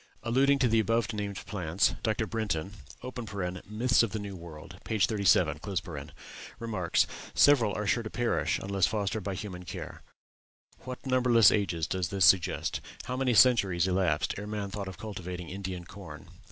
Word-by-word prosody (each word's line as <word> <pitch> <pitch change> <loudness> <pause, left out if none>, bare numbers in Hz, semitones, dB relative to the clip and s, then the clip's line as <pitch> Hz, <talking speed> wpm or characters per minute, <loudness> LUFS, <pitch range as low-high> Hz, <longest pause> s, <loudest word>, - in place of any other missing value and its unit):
Alluding 135 +4 +3
to 135 -2 +2
the 115 -1 +3
above 115 +2 +1
named 100 -2 -4
plants 90 -2 0
Dr. 110 +1 0
Brinton 95 -4 -3 1.0
("Myths 120 +3 +3
of 115 -4 -1
the - - -1
New 100 -2 -6
World," 85 -3 -11
p. 110 - -2
37) 100 -7 +3 1.0
remarks, 105 -7 0 0.3
'Several 120 -8 +5
are 105 - -2
sure 115 +3 +1
to 110 - -6
perish 120 +1 0
unless 95 -1 +1
fostered 105 -1 -2
by 95 0 -3
human 90 -2 -6
care. 90 - -8 0.8
What 130 +1 -7
numberless 125 -5 +5
ages 90 -6 0
does 90 -1 -2
this 95 -1 +3
suggest? 95 -2 +3 0.2
How 125 - -4
many 130 -2 +1
centuries 100 -8 +5
elapsed 90 -4 +1
ere 105 - -6
man 105 -2 -4
thought 100 -1 -5
of 95 - -8
cultivating 90 -4 -6
Indian 95 -2 -5
corn? 85 -5 -11
100 Hz, 155 wpm, -29 LUFS, 90-115 Hz, 1.0 s, Several